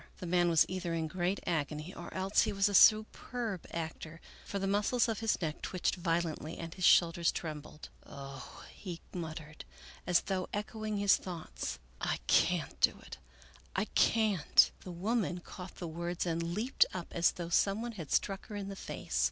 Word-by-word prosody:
The 185 - -7
man 175 0 +3
was 165 -2 +5
either 180 -2 -3
in 160 -1 -1
great 180 +4 -1
agony 155 +1 -2
or 175 - -8
else 190 +1 +2
he 215 - +1
was 195 0 +2
a 205 - -2
superb 215 0 +3
actor, 160 0 -5 0.3
for 200 - -4
the 195 - -1
muscles 205 +5 +2
of 225 -2 -2
his 225 -1 +1
neck 160 -3 -3
twitched 185 - -1
violently 165 -3 -2
and 165 -1 -6
his 185 0 -1
shoul 170 -2 +7
ders 170 0 +1
trembled. 150 -1 -7
" - - -27
Oh," 135 -1 -9
he 175 -4 -7
muttered, 155 -3 -6 0.4
as 180 -1 +4
though 185 -2 -2
echoing 215 0 -3
his 200 -1 +5
thoughts, 165 - -5
" - - -28
I - - 0
can't - - +2
do - - +4
it, - - -10 0.6
I 200 - +1
can't! 215 -8 +4
" - - -32
The 180 - -7
woman 190 +1 -1
caught 180 +1 -10
the 175 - -5
words 170 +2 -3
and 165 -1 -1
leaped 205 +10 +2
up 175 -2 -5
as 170 0 +3
though 170 -1 -5
some 200 +5 +2
one 240 - -3
had 170 -10 -8
struck 195 -1 0
her 210 - -7
in 200 -1 -4
the 195 - -6
face. - - -4
180 Hz, 195 wpm, -32 LUFS, 165-200 Hz, 0.6 s, shoul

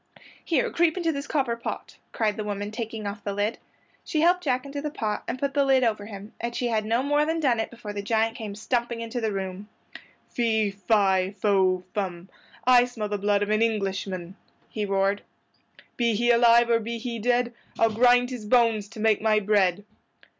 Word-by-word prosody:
"Here, 320 -6 +1
creep 335 0 +2
into 335 -2 +1
this 280 -1 -5
copper 265 -6 0
pot," 235 - -7
cried 215 -3 0
the 215 - -4
woman, 205 0 -4
taking 225 -1 -5
off 200 +1 -5
the 200 - -3
lid. 205 +3 -1 0.4
She 310 - -1
helped 355 +2 +4
Jack 255 -3 0
into 280 +1 -5
the 300 - -3
pot 215 -7 -3
and - - -3
put 275 +1 -2
the 285 0 +3
lid 265 -1 +3
over 215 -3 0
him, 205 0 -10
and 235 +1 -3
she 245 - -1
had 215 -2 0
no 230 +4 +1
more 290 +1 +2
than 320 +2 -1
done 255 -7 +2
it 225 - -2
before 225 -3 -8
the 205 - -4
giant 225 +2 0
came 215 -5 -6
stumping 235 +2 -2
into 230 +1 -4
the 220 -1 0
room. 195 +1 -5 0.6
"Fee, 220 -3 0
fi, 195 -1 +1
fo, 190 -3 +2
fum! 185 -3 -4 0.4
I 245 -1 +6
smell 225 -4 -5
the 205 -1 -2
blood 205 0 +2
of 205 - -2
an 215 +1 +2
Englishman!" 195 -4 -2 0.3
he 210 -2 -3
roared. 195 +1 +1 0.8
"Be 235 -2 +2
he 240 +3 +3
alive 235 0 +5
or 230 - +4
be 230 +1 -4
he 235 0 -5
dead 240 +1 +1 0.2
I'll 225 -1 +3
grind 245 +2 +4
his 230 -4 -6
bones 230 -3 +3
to 210 +2 -12
make 215 -1 +2
my 215 -1 +3
bread." 200 -2 +1
225 Hz, 205 wpm, -25 LUFS, 205-245 Hz, 0.8 s, I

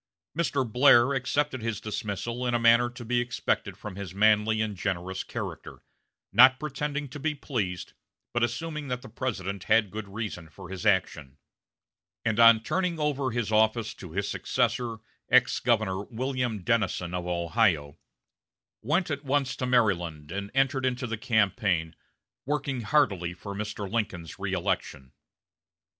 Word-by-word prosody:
Mr. 145 -6 0
Blair 125 +2 +5
accepted 135 0 -1
his 115 -3 -2
dismissal 110 +3 -3
in 120 - +1
a - - +2
manner 115 +1 +5
to 120 0 -10
be 120 +1 +1
expected 120 - -2
from 105 -3 -8
his 95 -3 -7
manly 110 +1 +3
and 110 -2 -1
generous 95 0 -3
character, - - -7 0.5
not 130 +2 +7
pretending 145 0 -3
to 145 +3 -9
be 155 +1 -1
pleased, 105 - -3 0.4
but 120 - 0
assuming 150 +6 -2
that 125 -1 -3
the - - -9
President 100 -5 -4
had 110 -3 +3
good 110 -1 -6
reason 100 -5 -6
for 90 +2 -12
his 95 +3 -3
action; 75 -8 0 0.9
and, 110 0 +1
on 115 -1 +7
turning 180 +3 -1
over 145 -3 0
his 115 -2 -2
office 110 +1 +2
to 90 - -11
his 100 +4 -2
successor, 120 -2 -1 0.3
ex 125 0 +4
Governor 105 -5 +1
William 125 -3 -2
Dennison 95 -6 0
of 90 -1 -3
Ohio, 85 -4 +1 0.8
went 165 +3 0
at 145 0 -3
once 135 -1 0
to 125 - -2
Maryland 90 -11 +1
and 100 +2 -4
entered 135 0 +2
into 125 0 -1
the 115 -1 -3
campaign, 100 -7 +1 0.5
working 140 -3 -1
heartily 100 - +1
for 100 +2 -7
Mr. 105 0 -4
Lincoln's 95 -7 -3
reëlection. 95 -8 -2
110 Hz, 150 wpm, -27 LUFS, 95-130 Hz, 0.9 s, not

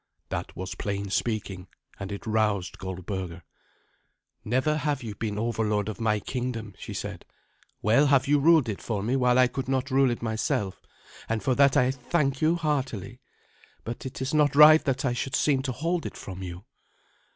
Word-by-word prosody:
That - - -4
was 95 0 -5
plain 100 -1 -4
speaking, 100 -5 -2 0.3
and 95 +1 -5
it 100 - -6
roused 105 -4 0
Goldberga. 95 -2 -5 1.0
"Never 130 +7 +1
have 145 -4 -1
you 110 -3 -5
been 105 -1 -4
overlord 105 -2 0
of 110 - -6
my 105 -2 +2
kingdom," 115 -2 -4
she - - -7
said. - - -5 0.6
"Well 120 +8 +4
have 140 -1 +3
you 145 +1 +4
ruled 155 -2 +5
it 105 -3 -4
for 105 -4 -3
me 120 +5 0
while 125 -1 +3
I 130 - +7
could 130 +1 -4
not 135 +1 -1
rule 135 0 +4
it 120 -1 -3
myself, 110 -3 -1 0.5
and 110 -1 -1
for 130 - +2
that 140 +1 +4
I 125 +1 +4
thank 135 +1 -1
you 160 +2 +3
heartily. 130 - -2 0.6
But 115 +3 -5
it 130 0 -5
is 130 - -3
not 150 -2 +3
right 155 +2 +8
that 135 -1 0
I 125 - +1
should 130 +2 -2
seem 140 -3 +2
to 130 -1 -3
hold 165 +6 -2
it - - -9
from 95 -1 -8
you." 90 +2 -7
120 Hz, 185 wpm, -27 LUFS, 105-135 Hz, 1.0 s, right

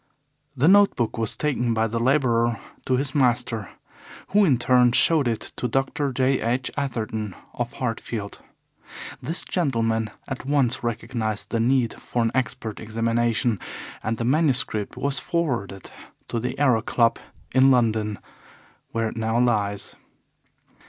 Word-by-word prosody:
The 140 +5 +3
note 200 +2 +6
book 120 -2 -1
was 110 -2 -1
taken 125 -6 0
by 110 0 +2
the 115 +1 -2
labourer 120 -3 +2 0.3
to 130 - +2
his 135 0 -2
master, 120 -6 +1 0.6
who 210 +1 +4
in 140 -8 +4
turn 125 0 +4
showed 155 0 +4
it 115 -2 -3
to 125 - -1
Dr. 135 +3 -1
J. 130 +1 +1
H. 125 +3 -1
Atherton, 110 -7 -3 0.2
of 120 -1 -3
Hartfield. 115 -4 -4 0.8
This 165 +3 -2
gentleman 115 - 0 0.2
at 130 - -5
once 135 -4 +1
recognized 115 -2 -3
the 115 - 0
need 120 0 +1
for 120 - -1
an 115 - +1
expert 110 -3 -2
examination, 115 0 0 0.4
and 110 +1 -2
the 115 - -2
manuscript 130 -7 0
was 140 -1 +1
forwarded 120 - -2 0.4
to 115 - -1
the 125 +2 -3
Aero 130 -6 +3
Club 115 +1 +2 0.3
in 130 +1 +6
London, 110 -4 +2 0.8
where 115 -1 0
it - - -9
now 110 +1 0
lies. 105 -5 0
120 Hz, 140 wpm, -24 LUFS, 115-130 Hz, 0.8 s, note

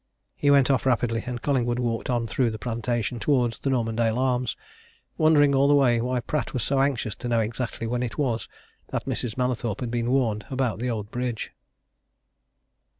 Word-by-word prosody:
He 145 - +1
went 140 -1 +5
off 135 -1 +1
rapidly, 115 -3 +1
and 125 -2 -4
Collingwood 120 -4 +1
walked 120 -1 -2
on 120 -2 +1
through 120 +3 +1
the 110 - -5
plantation 120 +1 -2
towards 120 -4 +1
the 140 - -1
Normandale 115 -2 +1
Arms 125 -2 0 0.6
wondering, 150 -2 +4
all 135 +1 +4
the 145 - +5
way, 120 -5 +4
why 125 +1 -1
Pratt 145 0 -2
was 120 - 0
so 135 +3 +1
anxious 135 -6 0
to 120 - -5
know 120 -1 +2
exactly 115 +1 -3
when 120 +2 -1
it 120 -3 -3
was 125 -6 -1 0.4
that - - -3
Mrs. 120 -2 -3
Mallathorpe 125 -4 -1
had 120 -2 -3
been 120 0 -1
warned 115 -6 +1
about 130 -4 -1
the 125 +1 -1
old 110 -2 -4
bridge. 120 -2 -3
120 Hz, 185 wpm, -25 LUFS, 115-130 Hz, 0.6 s, went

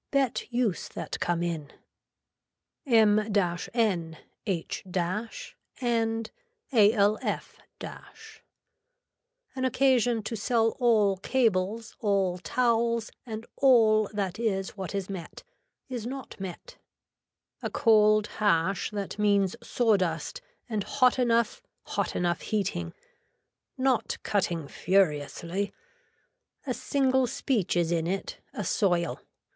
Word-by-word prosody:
Bet 270 -3 0
use 235 -6 0
that - - -6
come 175 -1 0
in. 165 -4 -3 1.2
M 220 -4 +5
N 195 -3 0 0.3
H 175 -5 -2 1.0
AND 225 -2 0 0.4
ALF. 210 -2 +3 1.3
An - - -13
occasion 250 -3 +2
to 230 - -4
sell 225 +1 +2
all 215 -6 +4
cables 220 -1 0
all 195 -4 +1
towels 235 +2 +1 0.2
and 220 0 -5
all 220 -6 +5
that 200 -1 -3
is 195 -4 0
what 190 0 -5
is 195 -2 -2
met, 185 -4 -7 0.4
is 245 -4 -4
not 265 -3 -7
met. 195 - -8 0.8
A - - -2
cold 215 -2 +4
hash 190 -3 +1
that 205 0 -5
means 200 -2 +3
saw 225 -4 +2
dust 165 -4 -2 0.3
and 215 -4 -2
hot 255 +4 +3
enough, 235 - +2 0.2
hot - - -2
enough 175 -1 0
heating. 170 - -2 0.8
Not 260 -2 +1
cutting 175 -7 0
furiously. 180 +2 0 0.9
A - - -1
single 265 -2 +1
speech 225 -7 0
is 170 -1 +1
in 165 -1 0
it, 190 +2 -3
a - - -4
soil. 175 -5 +1
215 Hz, 105 wpm, -28 LUFS, 185-235 Hz, 1.3 s, M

